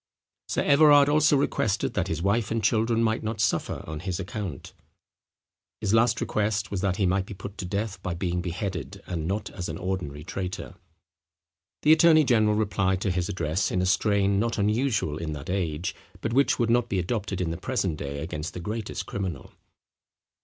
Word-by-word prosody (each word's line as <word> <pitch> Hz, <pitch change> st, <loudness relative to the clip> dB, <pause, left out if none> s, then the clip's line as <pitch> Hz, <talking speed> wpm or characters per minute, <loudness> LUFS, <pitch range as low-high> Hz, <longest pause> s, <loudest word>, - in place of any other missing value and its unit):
Sir -, -, 0 dB
Everard 145 Hz, -1 st, +6 dB
also 150 Hz, 0 st, +4 dB
requested 110 Hz, -6 st, 0 dB
that -, -, 0 dB
his 80 Hz, +1 st, -3 dB
wife 105 Hz, +2 st, +1 dB
and 115 Hz, -1 st, -1 dB
children 115 Hz, +2 st, +2 dB
might 110 Hz, 0 st, +1 dB
not 110 Hz, 0 st, -4 dB
suffer 105 Hz, -, 0 dB
on 80 Hz, -1 st, -6 dB
his 90 Hz, +1 st, -3 dB
account. 95 Hz, -, -6 dB, 1.1 s
His 105 Hz, -1 st, 0 dB
last 115 Hz, +1 st, +4 dB
request 105 Hz, -1 st, -1 dB
was 100 Hz, -3 st, -2 dB
that 95 Hz, -2 st, +1 dB
he 95 Hz, -, +1 dB
might 95 Hz, +1 st, +1 dB
be 100 Hz, -, -7 dB
put 100 Hz, +2 st, -8 dB
to 95 Hz, -, -3 dB
death 100 Hz, +3 st, -3 dB
by 90 Hz, -2 st, -3 dB
being 90 Hz, 0 st, -1 dB
beheaded, 90 Hz, -2 st, -4 dB
and 85 Hz, -3 st, -3 dB
not 100 Hz, +4 st, -2 dB
as 90 Hz, -4 st, -5 dB
an 80 Hz, -, -4 dB
ordinary 90 Hz, -6 st, -4 dB
traitor. 95 Hz, +3 st, -5 dB, 1.1 s
The 155 Hz, -, +7 dB
attorney 160 Hz, -1 st, +6 dB
general 110 Hz, -5 st, +3 dB
replied 100 Hz, -3 st, +1 dB
to 100 Hz, -, 0 dB
his 90 Hz, -1 st, -1 dB
address 85 Hz, +1 st, -1 dB
in 90 Hz, -, 0 dB
a 90 Hz, -, +1 dB
strain 100 Hz, +1 st, +2 dB
not 115 Hz, +2 st, 0 dB
unusual 105 Hz, -, +1 dB
in 80 Hz, -2 st, -3 dB
that 75 Hz, +3 st, -6 dB
age, 85 Hz, -3 st, -2 dB, 0.3 s
but 110 Hz, -, -2 dB
which 140 Hz, +2 st, +3 dB
would 115 Hz, -2 st, +1 dB
not 120 Hz, 0 st, +2 dB
be 100 Hz, -, 0 dB
adopted 95 Hz, +1 st, -2 dB
in 85 Hz, -3 st, -1 dB
the 85 Hz, -, -4 dB
present 95 Hz, -6 st, -1 dB
day 70 Hz, 0 st, -5 dB
against 80 Hz, 0 st, -5 dB
the -, -, -4 dB
greatest 105 Hz, +4 st, -4 dB
criminal. 95 Hz, -8 st, -5 dB
100 Hz, 190 wpm, -26 LUFS, 90-110 Hz, 1.1 s, The